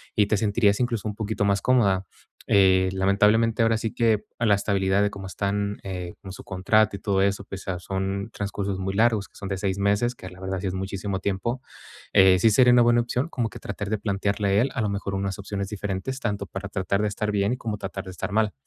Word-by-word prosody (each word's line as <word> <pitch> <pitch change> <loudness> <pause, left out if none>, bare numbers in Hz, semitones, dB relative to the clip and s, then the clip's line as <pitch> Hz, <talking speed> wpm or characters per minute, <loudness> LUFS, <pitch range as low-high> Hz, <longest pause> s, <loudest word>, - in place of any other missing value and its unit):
y 105 - +4
te 105 - +2
sentirías 100 +1 +2
incluso 115 -4 -1
un 105 - -4
poquito 110 -1 -2
más 100 0 +2
cómoda. 100 -7 +2 0.4
Eh, 95 -2 +4
lamentablemente, 105 +5 +3
ahora 115 0 +3
sí 115 0 -3
que 110 -3 +2
a 115 - 0
la 105 -2 +5
estabilidad 100 -1 +1
de 105 - +2
cómo 95 -1 -8
están, 100 +2 -2
eh, 90 -2 -5
con 95 -2 -9
su - - -10
contrato 100 +3 +2
y - - -14
todo 100 -1 +1
eso, 100 0 0
pues, 95 -1 -7
o - - -12
sea, 90 -2 -3
son 95 +3 -3
transcursos 100 -1 -3
muy 95 +1 -2
largos, 110 -1 +2
que - - -32
son 100 - -6
de 95 - -2
6 95 0 -1
meses, 100 +5 +1
que 95 - -11
la 90 0 -14
verdad 95 0 -3
sí 95 - -3
es 90 - -2
muchísimo 95 +1 -3
tiempo. 100 +7 -2 0.5
Eh, 95 -1 +6
sí 115 - +5
sería 125 +3 +5
una 120 - +6
buena 120 0 +4
opción, 125 +6 -2
como 120 -7 -2
que - - -10
tratar 100 0 -5
de 110 - 0
plantearle 100 0 -1
a 105 - +5
él, 135 - 0
a 125 - -2
lo 105 - 0
mejor, 100 0 -3
unas 95 0 -2
opciones 100 0 -4
diferentes, 105 +5 -4
tanto 100 -6 -3
para 95 +2 -6
tratar 100 +1 -1
de - - +2
estar 105 +1 -2
bien, 100 +4 +1
como 110 -3 -4
tratar 95 -1 -6
de - - -8
estar 95 +3 -5
mal. 110 0 +1
100 Hz, 240 wpm, -25 LUFS, 95-110 Hz, 0.5 s, Eh